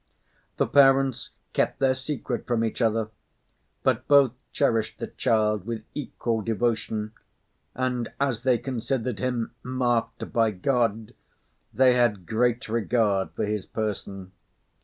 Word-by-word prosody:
The - - +3
parents 135 -3 +4 0.2
kept - - +1
their 135 -1 +3
secret 130 -2 -4
from 115 -2 +1
each 115 - -3
other. 110 -1 +1 0.7
But - - +1
both 140 -4 +6 0.2
cherished 115 -6 0
the - - -4
child 105 -4 0
with 115 -2 -4
equal 120 -5 -2
devotion, 110 -1 -1 0.6
and 125 -2 -1
as 135 -5 0
they 130 -1 +3
considered 125 -2 -3
him 125 -3 -1
marked 125 -2 -1
by 115 -1 +3
God, 115 +1 0 0.6
they 130 -1 +5
had 115 -7 +1
great 120 +5 0
regard 110 -3 +1
for - - -1
his 105 -1 -3
person. 100 -3 -4
115 Hz, 125 wpm, -26 LUFS, 110-130 Hz, 0.7 s, both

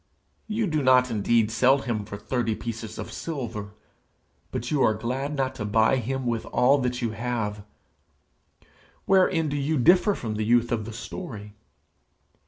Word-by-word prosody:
You 220 +1 0
do 155 -5 0
not 130 -1 +4
indeed 115 +1 +2
sell 130 +4 +4
him 115 -6 -3
for 100 0 -7
thirty 115 -1 -1
pieces 110 -1 -6
of - - -6
silver, 115 -10 -5 0.8
but 120 - -4
you 145 -3 +1
are 110 - +4
glad 130 +6 -3
not 135 -2 -1
to - - 0
buy 110 +5 +3
him 130 +2 -3
with 115 -2 -1
all 135 +3 +3
that 125 -1 -2
you 115 - 0
have! 110 -2 -3 1.4
Wherein 185 -4 +3
do 145 0 -2
you 145 +3 0
differ 180 - +4
from 110 -3 -4
the 110 - -1
youth 120 +2 +2
of 110 -3 -1
the 115 - -7
story? 110 - -8
120 Hz, 165 wpm, -25 LUFS, 110-135 Hz, 1.4 s, not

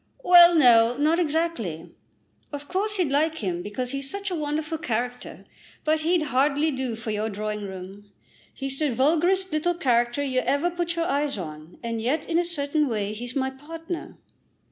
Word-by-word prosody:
"Well, 350 -1 +8
no; 240 -5 +5
not 310 +4 +2
exactly. 305 - -2 0.6
Of 290 0 -7
course 410 +4 -1
you'd 345 -7 +1
like 310 +3 +2
him 180 - -3
because 245 +6 -3
he 275 - -2
is 275 0 -3
such 400 +3 -4
a - - -1
wonderful 305 +1 -2
character, 245 -2 -4 0.4
but 310 +1 +2
he'd 330 +1 +1
hardly 290 +4 +2
do 260 -4 -3
for 225 0 -5
your 215 +1 -1
drawing 210 0 -4
room. 195 +2 -10 0.4
He's 270 0 -6
the 295 -6 0
vulgarest 340 +8 +2
little 310 +3 0
creature 240 -2 +1
you 260 -2 0
ever 285 +7 0
put 345 -1 -2
your 335 0 0
eyes 285 -3 0
on; 155 -2 -8
and 230 -1 -3
yet 275 +7 -1
in 335 0 +1
a 350 - 0
certain 300 -2 -1
way 210 -4 -2
he's 240 +3 -7
my 265 -1 0
partner." 325 +5 -8
280 Hz, 180 wpm, -25 LUFS, 235-325 Hz, 0.6 s, Well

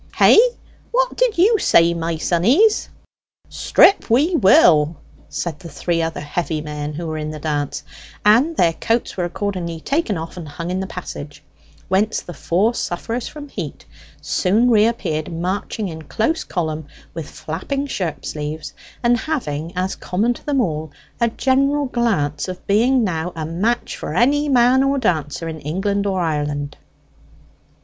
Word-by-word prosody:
Hey - - +7 0.5
what - - +1
did - - +1
you 420 +5 +4
say, 170 - +4
my 165 0 -2
sonnies?" 240 - +3 0.6
"Strip 395 - +4
we 290 +10 +3
will!" 165 - +5 0.3
said 160 -4 -4
the 170 - -10
three 165 +3 -1
other 165 0 -3
heavy 155 +1 -2
men 150 0 -5
who 170 +2 -5
were 155 -1 -3
in 150 0 -4
the 155 - -6
dance; 145 -2 -2 0.4
and 255 +11 +4
their 165 -2 +4
coats 230 +7 -1
were 180 - -1
accordingly 175 -3 -3
taken 275 - -1
off 165 +2 -7
and 170 -3 -7
hung 170 +4 -5
in 185 - -1
the 190 - -3
passage, 145 -5 -8 0.4
whence 205 +4 +1
the 175 - -9
four 195 +9 +1
sufferers 230 +4 -3
from 295 -1 -9
heat - - -7 0.3
soon 220 +6 +2
reappeared, 210 -9 +1
marching 185 +5 -3
in 160 -2 -7
close 225 - -1
column, 160 -4 -3 0.3
with 160 -3 -6
flapping 185 - -4
shirt 170 - -4
sleeves, 150 +1 -5 0.3
and 240 0 +4
having, 165 - -3
as 185 +1 0
common 215 +7 0
to - - -14
them 285 -2 0
all, 155 -6 -2 0.3
a 235 - +3
general 275 +4 +1
glance 195 - 0
of 185 -1 -7
being 240 +5 +3
now 175 -3 -2
a 160 -1 -4
match 200 +10 -1
for - - -5
any 290 +4 +3
man 250 0 +5
or 275 +1 +1
dancer 165 - -1
in 160 -1 -5
England 200 +7 -1
or 190 -1 0
Ireland. 145 -3 -2
180 Hz, 155 wpm, -20 LUFS, 160-240 Hz, 0.6 s, Hey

